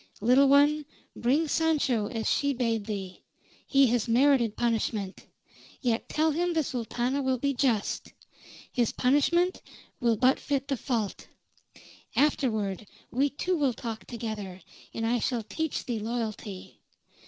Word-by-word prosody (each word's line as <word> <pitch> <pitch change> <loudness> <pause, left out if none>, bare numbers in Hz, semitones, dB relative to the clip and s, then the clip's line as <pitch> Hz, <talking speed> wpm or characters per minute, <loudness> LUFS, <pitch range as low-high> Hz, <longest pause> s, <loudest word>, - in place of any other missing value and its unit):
"Little 255 +6 +5
one, 290 +1 +4 0.3
bring 280 +7 +1
Sancho 285 -9 +1
as 225 0 -3
she 285 0 +2
bade 230 -4 -1
thee. 190 -4 -5 0.5
He 275 0 +5
has 240 -1 +1
merited 240 -2 +3
punishment. 220 -4 -1 0.5
Yet 235 -2 -1
tell 315 +1 +2
him 345 +3 0
the 320 -1 +2
Sultana 245 +2 -2
will 260 -1 +1
be 280 +3 0
just. 240 -5 0 0.6
His 240 -4 +1
punishment 340 +8 +2 0.4
will 235 -3 +2
but 255 +4 +3
fit 275 -2 -2
the 275 - +1
fault. 225 -6 -3 0.9
Afterward 220 -9 +1 0.2
we 275 +4 +2
two 360 +6 -1
will 280 -6 +1
talk 225 -1 -6
together, 210 -6 -6 0.3
and 225 - -3
I 240 +1 +1
shall 235 0 -1
teach 320 +8 -3
thee 240 -4 -2
loyalty. 215 -3 -5
245 Hz, 135 wpm, -28 LUFS, 225-280 Hz, 0.9 s, Little